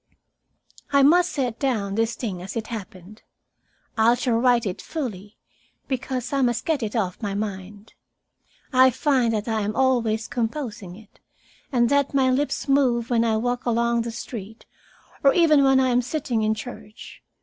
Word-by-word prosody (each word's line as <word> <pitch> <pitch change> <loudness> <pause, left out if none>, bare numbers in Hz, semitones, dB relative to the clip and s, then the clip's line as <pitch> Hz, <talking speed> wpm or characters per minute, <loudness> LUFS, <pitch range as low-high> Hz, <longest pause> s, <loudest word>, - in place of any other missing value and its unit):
"I 280 -1 +5
must 350 +5 +4
set 250 -5 -2
down 220 -8 -1
this 225 +2 0
thing 200 -7 -5
as 190 +2 -7
it 225 0 -5
happened. 205 -1 -9 0.7
I 230 +1 +4
shall 245 -2 0
write 245 -1 +3
it 185 -3 -4
fully, 215 - -6 0.5
because 260 -1 -3
I 275 - +1
must 240 -2 0
get 315 -5 0
it 215 -1 -4
off 190 -4 -2
my 200 -2 -3
mind. 205 0 -6 0.8
I 260 0 +6
find 255 -2 +1
that 215 0 -2
I 220 -1 0
am 210 +1 -3
always 235 -4 +1
composing 230 -6 -4
it, 215 0 -18 0.5
and 240 -3 +3
that 280 0 +1
my 260 -1 +3
lips 285 +3 -1
move 255 -4 +2
when 230 -1 +3
I 225 -1 +1
walk 245 +2 -2
along 235 0 +1
the 235 - -4
street 225 -2 -8 0.6
or 275 - +5
even 310 -5 +5
when 270 -1 +4
I 260 -1 +2
am 245 0 +2
sitting 255 -2 -2
in 215 0 +1
church. 220 -2 -10
235 Hz, 170 wpm, -23 LUFS, 215-260 Hz, 0.8 s, I